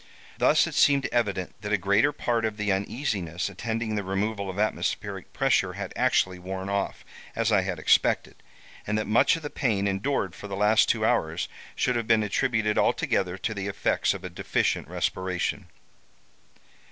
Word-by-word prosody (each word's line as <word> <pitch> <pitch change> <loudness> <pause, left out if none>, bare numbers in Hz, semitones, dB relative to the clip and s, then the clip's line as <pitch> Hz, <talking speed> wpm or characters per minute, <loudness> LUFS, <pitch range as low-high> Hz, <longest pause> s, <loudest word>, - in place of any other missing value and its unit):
Thus - - +5
it - - -5
seemed 140 -2 +4
evident 100 -6 -1
that 105 - -4
a 105 - +4
greater 100 +9 +3
part 120 -5 -1
of 110 -1 -2
the 105 -1 0
uneasiness 95 - -2
attending 110 +3 -3
the 105 -1 -1
removal 100 +1 -2
of 95 - -6
atmospheric 105 +1 -2
pressure - - +1
had - - -6
actually 95 -1 +2
worn 95 +1 -5
off, 100 0 -2 0.3
as 115 0 +1
I 100 -3 +4
had 90 -2 -3
expected, 80 - +2 0.5
and 105 +1 0
that 110 - -1
much 110 +9 +4
of 165 - -7
the 145 - -5
pain 105 -7 0
endured 100 0 -1
for 105 - -9
the 100 - -5
last 105 +2 +4
two 110 -1 +2
hours 80 -10 0 0.3
should 125 - +1
have 115 -2 -2
been 110 -2 +4
attributed 105 0 +1
altogether 95 -1 +1
to 110 +4 -3
the 100 -2 -4
effects 100 - 0
of - - -8
a - - -5
deficient - - -1
respiration. 95 -1 -2
105 Hz, 175 wpm, -26 LUFS, 95-115 Hz, 0.5 s, Thus